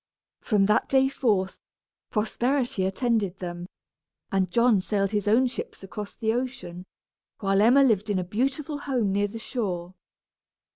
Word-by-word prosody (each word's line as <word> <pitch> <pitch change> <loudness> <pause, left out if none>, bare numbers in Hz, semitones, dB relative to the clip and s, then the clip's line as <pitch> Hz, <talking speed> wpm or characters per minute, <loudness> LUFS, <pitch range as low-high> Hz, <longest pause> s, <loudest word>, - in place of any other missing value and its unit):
From 205 -4 +2
that 210 - +2
day 265 0 +4
forth, 205 -8 0 0.5
prosperity 240 -1 0
attended 200 -2 0
them, 175 -1 -6 0.6
and 190 -2 +1
John 235 +1 +4
sailed 195 0 0
his 210 -2 -1
own 230 +5 +4
ships 245 -5 -5
across 200 +2 -7
the 220 0 0
ocean, 235 -8 -4 0.5
while 195 -1 +2
Emma 250 +6 +6
lived 215 -5 +2
in 205 - +1
a 185 - 0
beautiful 270 - -2
home 250 -8 0
near 205 +1 +1
the 215 +3 -8
shore. 190 -7 -4
210 Hz, 145 wpm, -26 LUFS, 195-245 Hz, 0.6 s, Emma